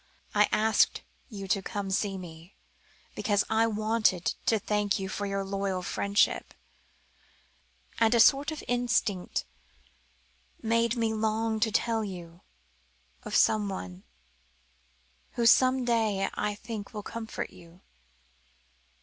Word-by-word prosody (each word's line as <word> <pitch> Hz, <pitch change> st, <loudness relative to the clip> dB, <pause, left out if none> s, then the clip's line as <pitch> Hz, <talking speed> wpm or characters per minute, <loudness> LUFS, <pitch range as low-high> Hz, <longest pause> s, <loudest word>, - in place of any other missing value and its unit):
"I 210 Hz, 0 st, +4 dB
asked 220 Hz, +1 st, +2 dB, 0.3 s
you 200 Hz, -4 st, -7 dB
to 195 Hz, -, +2 dB
come 200 Hz, 0 st, -4 dB
to -, -, -1 dB
see 195 Hz, 0 st, 0 dB
me, 170 Hz, 0 st, -11 dB, 0.6 s
because 205 Hz, -2 st, +1 dB
I 225 Hz, +1 st, +3 dB
wanted 215 Hz, -4 st, +1 dB
to 225 Hz, -, +4 dB
thank 210 Hz, 0 st, 0 dB
you 190 Hz, -1 st, -4 dB
for 205 Hz, +1 st, -3 dB
your 195 Hz, 0 st, -2 dB
loyal 195 Hz, -1 st, -2 dB
friendship 200 Hz, +3 st, 0 dB, 1.4 s
and 225 Hz, +1 st, +4 dB
a -, -, +4 dB
sort 275 Hz, +6 st, +5 dB
of 310 Hz, -, -6 dB
instinct 240 Hz, -6 st, 0 dB, 1.1 s
made 230 Hz, +1 st, +1 dB
me 225 Hz, -2 st, 0 dB
long 220 Hz, 0 st, 0 dB
to 220 Hz, 0 st, +1 dB
tell 225 Hz, 0 st, +1 dB
you 175 Hz, -3 st, -8 dB, 0.8 s
of -, -, -5 dB
someone 190 Hz, -, +1 dB, 1.3 s
who 235 Hz, -, -1 dB
some 255 Hz, +2 st, +5 dB
day 220 Hz, -5 st, +1 dB
I 210 Hz, 0 st, -2 dB
think 215 Hz, 0 st, -7 dB
will 210 Hz, -, -5 dB
comfort 230 Hz, +1 st, -5 dB
you." 175 Hz, +1 st, -17 dB
210 Hz, 125 wpm, -28 LUFS, 195-225 Hz, 1.4 s, sort